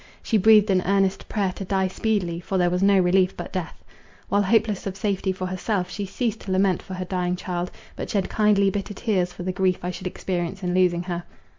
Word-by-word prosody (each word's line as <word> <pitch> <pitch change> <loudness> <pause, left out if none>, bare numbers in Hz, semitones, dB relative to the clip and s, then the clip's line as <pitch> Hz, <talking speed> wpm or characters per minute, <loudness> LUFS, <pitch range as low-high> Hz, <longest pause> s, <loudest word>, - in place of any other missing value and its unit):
She 220 - +2
breathed 215 0 +6
an 185 -1 +3
earnest 195 -1 +1
prayer 200 -3 0
to 195 - -7
die 190 0 +1
speedily, 185 -4 -1
for 190 +2 -2
there 175 -1 +2
was 180 +1 0
no 200 0 +5
relief 185 0 +3
but - - -7
death. 180 -3 -5 0.5
While 205 - +3
hopeless 210 0 +1
of 195 0 -5
safety 195 -1 0
for 185 0 -4
herself, 185 +1 -2
she 205 -2 -4
ceased 225 +2 -2
to 190 - -6
lament 185 -1 +2
for 190 - -8
her 185 0 -4
dying 180 -1 -1
child, 180 -1 -3 0.3
but - - -5
shed 195 -3 0
kindly, 205 -2 +3
bitter 205 +1 -4
tears 190 -6 0
for 180 - -8
the 185 - -1
grief 185 -1 +1
I 180 - -2
should 185 +1 -6
experience 185 +1 -3
in 180 0 -1
losing 180 -1 +2
her. 175 -1 -3
190 Hz, 225 wpm, -24 LUFS, 180-200 Hz, 0.5 s, breathed